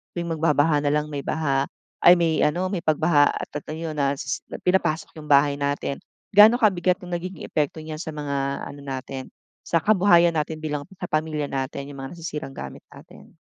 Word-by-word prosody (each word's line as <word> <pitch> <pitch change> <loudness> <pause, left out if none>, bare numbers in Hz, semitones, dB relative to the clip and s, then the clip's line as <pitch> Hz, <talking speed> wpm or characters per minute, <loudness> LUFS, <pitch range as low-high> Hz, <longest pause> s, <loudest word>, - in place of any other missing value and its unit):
tuwing 170 -1 -3
magbabaha 150 -1 +3
na 145 0 0
lang 150 0 0
may 140 -1 -3
baha 140 -3 0 0.4
ay 175 - +10
may 165 -2 +1
ano, 180 +5 0
may 185 -3 -3
pagbaha 155 -1 +4
at - - -5
a - - -3
ayun 160 -1 -5
na 140 -1 +2
s - - -6
s - - 0 0.3
pinapasok 180 -3 +1
yung 150 - -10
bahay 140 0 +4
natin. 140 -1 -2 0.4
Gaano 215 +4 +8
kabigat 185 -6 +2
yung 175 - -7
nagiging 180 +1 -5
epekto 150 0 -1
niya 155 0 -6
sa 160 - -6
mga 140 -2 -3
ano 140 0 -9
natin, 135 -1 -6 0.3
sa 170 - 0
kabuhayan 175 -3 +4
natin 155 0 -2
bilang 150 -2 -3 0.2
sa 180 - -5
pamilya 155 -2 -1
natin, 135 0 -4
yung 140 - -8
mga 135 +6 -8
nasisirang 160 -4 -5
gamit 70 -1 -7
natin? - - -16
155 Hz, 190 wpm, -24 LUFS, 140-170 Hz, 0.4 s, ay